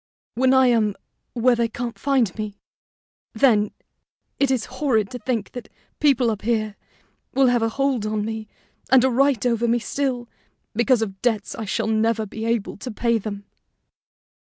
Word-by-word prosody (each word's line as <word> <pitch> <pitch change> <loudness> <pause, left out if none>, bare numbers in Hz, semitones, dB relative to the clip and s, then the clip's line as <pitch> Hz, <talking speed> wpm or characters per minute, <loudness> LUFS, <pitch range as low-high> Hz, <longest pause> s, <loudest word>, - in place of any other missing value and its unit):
when 260 +2 +3
I 260 0 +5
am 220 -5 +2 0.4
where 245 +1 +3
they 235 0 +1
can't 235 +1 -5
find 265 -8 +1
me, 215 -2 -5 0.8
then, 220 -3 +3 0.7
it 275 - +3
is 255 -4 0 0.2
horrid 220 -9 +2
to 250 - -6
think 230 -2 -2
that 245 - -8 0.3
people 265 -6 +3
up 210 - -4
here 215 -2 -1 0.6
will 270 0 +5
have 245 -1 +2
a 225 - +1
hold 265 -3 0
on 215 -1 -1
me 220 -1 -5 0.4
and 260 -1 +6
a 260 - +3
right 265 -2 +2
over 235 -1 +1
me 235 +1 +3
still, 250 0 -2 0.5
because 235 +1 +3
of 195 -3 -7
debts 220 -4 0
I 225 - -5
shall 220 +2 -1
never 220 0 +1
be 220 +2 -6
able 230 -3 -1
to 250 - -7
pay 235 0 0
them." 205 -1 -6
230 Hz, 170 wpm, -23 LUFS, 215-255 Hz, 0.8 s, and